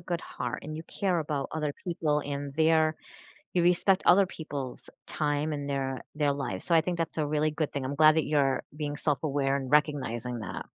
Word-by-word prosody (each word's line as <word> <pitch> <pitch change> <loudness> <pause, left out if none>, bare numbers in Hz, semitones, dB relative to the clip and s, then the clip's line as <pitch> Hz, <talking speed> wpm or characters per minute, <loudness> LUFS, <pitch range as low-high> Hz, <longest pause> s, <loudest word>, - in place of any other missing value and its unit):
good 170 -1 -2
heart 125 -1 -5
and 155 +1 -6
you 160 - -5
care 185 0 -1
about 150 -3 -2
other 150 -2 -1
people 155 -4 0
and 140 -1 -4
there 160 0 +3 0.6
you 180 - +3
respect 180 +2 +3
other 190 +2 +7
people's 145 -7 -6 0.2
time 150 0 0
and 145 -1 -4
their 135 -2 -2
their 150 -2 +2
lives. 135 -10 -4
So, 170 - +2
I 165 - +7
think 175 +1 -2
that's 165 -1 -2
a 150 - +1
really 150 +1 +1
good 155 0 -2
thing. 140 -2 -3
I'm 135 +2 -2
glad 155 0 +7
that 160 - +2
you're 140 -3 +2
being 145 -1 -3
self-aware 140 -2 0
and 135 -1 -4
recognizing 130 -5 +1
that. 105 - -6
150 Hz, 200 wpm, -29 LUFS, 140-160 Hz, 0.6 s, other